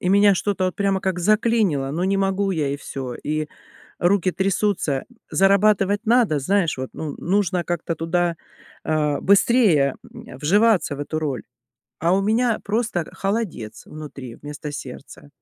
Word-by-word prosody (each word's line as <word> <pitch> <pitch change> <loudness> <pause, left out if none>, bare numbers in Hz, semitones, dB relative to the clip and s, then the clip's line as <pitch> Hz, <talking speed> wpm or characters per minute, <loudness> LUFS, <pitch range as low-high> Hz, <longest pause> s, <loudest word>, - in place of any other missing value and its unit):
и 180 - -1
меня 200 +1 +5
что-то 190 0 -1
вот 185 - -1
прямо 195 -1 0
как 190 -2 -1
заклинило: 210 -8 +2
ну, 165 +5 -2
не 195 +1 +1
могу 195 0 0
я 155 -6 0
и 140 - -2
всё, 130 -3 -6
и 155 +3 -3 0.5
руки 185 0 +2
трясутся, 190 -7 0 0.3
зарабатывать 200 +1 +3
надо, 230 -10 +3
знаешь, 170 -2 +1
вот, 130 - -4
ну 155 -3 -5
нужно 185 -1 0
как-то 170 -1 -2
туда, 170 +1 0 0.5
э, 150 -2 0
быстрее, 195 - +4
э, - - -12
вживаться 185 -1 +3
в - - -7
эту 155 +2 -3
роль, 140 -6 -2 0.6
а 170 +3 +2
у 195 - +1
меня 225 +2 +1
просто 210 -5 -1
холодец 195 - -3
внутри 140 -6 -9
вместо 145 +1 -7
сердца, 140 0 -9
180 Hz, 150 wpm, -22 LUFS, 150-200 Hz, 0.6 s, меня